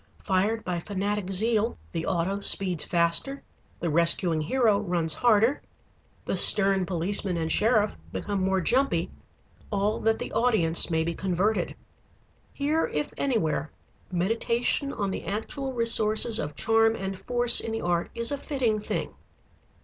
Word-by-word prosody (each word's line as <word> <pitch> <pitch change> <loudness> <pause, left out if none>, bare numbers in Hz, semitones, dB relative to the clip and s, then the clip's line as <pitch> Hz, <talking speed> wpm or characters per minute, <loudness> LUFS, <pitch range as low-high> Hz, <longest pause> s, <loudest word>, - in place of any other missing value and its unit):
Fired 205 +4 0
by 180 -2 -3
fanatic 200 +1 -3
zeal, 220 +3 +1
the 165 -1 -4
auto 190 +2 -1
speeds 185 -4 +1
faster, 170 +11 0 0.4
the 170 - -1
rescuing 170 0 +2
hero 215 +4 +1
runs 175 -5 0
harder, 230 - +2 0.6
the - - -2
stern 195 -2 +6
policeman 185 +1 0
and 160 -1 -2
sheriff 215 -1 +1 0.2
become 200 -2 -3
more 190 0 0
jumpy, 265 +9 0 0.6
all 205 +1 -1
that 225 0 +1
the - - -6
audience 215 -9 +1
may 160 -1 0
be 170 +1 -3
converted. 190 +4 -1 0.8
Here 300 +3 -1
if 150 0 -4
anywhere 160 - -1 0.4
meditation 230 +8 -1
on 200 -6 -3
the - - -5
actual 265 +7 -4
resources 225 -1 +2
of 150 -1 -5
charm 225 +3 +2
and 195 -2 -5
force 245 -1 +4
in 225 - -4
the 225 - -3
art 175 -1 -1
is 235 +2 0
a 285 - -3
fitting 250 -8 -1
thing. 210 - -4
205 Hz, 140 wpm, -26 LUFS, 175-225 Hz, 0.8 s, stern